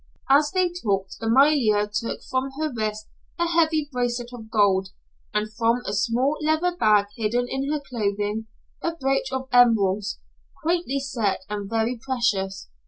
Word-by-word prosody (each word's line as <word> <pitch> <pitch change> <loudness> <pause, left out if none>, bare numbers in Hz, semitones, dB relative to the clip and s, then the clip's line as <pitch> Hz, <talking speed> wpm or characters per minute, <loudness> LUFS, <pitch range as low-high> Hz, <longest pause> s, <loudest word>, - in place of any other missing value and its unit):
As 295 +2 +5
they 370 0 +1
talked 195 -3 -1
Amalia 230 -3 +4
took 215 +3 -4
from 260 0 -2
her 310 -3 -1
wrist 215 -1 -3 0.3
a 345 - +1
heavy 320 -3 +2
bracelet 245 -1 -2
of 225 -2 -9
gold, 200 -4 +2 0.4
and 215 +1 -2
from 230 +2 +1
a - - -3
small 255 +6 +1
leather 315 +3 +1
bag 210 -9 +4
hidden 235 +2 0
in 270 +3 -2
her 305 - 0
clothing, 210 -4 -2 0.3
a 335 0 -2
brooch 270 -3 0
of 265 0 -3
emeralds, 210 -5 +4 0.5
quaintly 335 -4 0
set 240 -8 -1
and 205 -1 -4
very 225 +2 0
precious. 210 - -1
240 Hz, 150 wpm, -24 LUFS, 210-275 Hz, 0.5 s, As